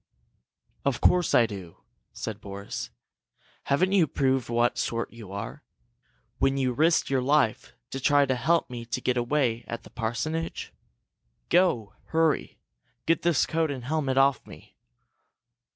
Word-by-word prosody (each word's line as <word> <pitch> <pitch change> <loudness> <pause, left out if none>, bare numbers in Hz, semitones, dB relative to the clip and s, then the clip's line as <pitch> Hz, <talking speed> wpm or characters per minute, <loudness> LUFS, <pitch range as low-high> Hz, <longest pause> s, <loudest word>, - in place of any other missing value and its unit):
"Of 140 -3 0
course 180 -2 +3
I 120 - +6
do!" 95 -6 -8 0.3
said 110 -1 -6
Boris. 100 0 -6 0.8
"Haven't 180 +7 +2
you 190 -5 +4
proved 130 -3 0
what 120 +1 +1
sort 115 0 -2
you 110 -5 -11
are, 105 +9 -6 0.8
when 135 0 +2
you 130 -2 +1
risked 160 +2 +2
your 135 -1 +2
life 135 -4 +1 0.2
to 135 - -4
try 145 +2 +4
to 130 - +1
help 160 +7 +2
me 120 -1 -5
to 115 - -3
get 125 - 0
away 120 -1 0
at 115 0 -5
the - - -15
parsonage? 130 +8 -3 0.8
Go! 170 - +2
Hurry! 160 -2 0 0.5
Get 165 - +2
this 170 -4 +3
coat 160 -1 0
and 130 -4 -5
helmet 140 -2 -1
off 135 -2 +4
me!" - - -14
130 Hz, 145 wpm, -27 LUFS, 115-155 Hz, 0.8 s, I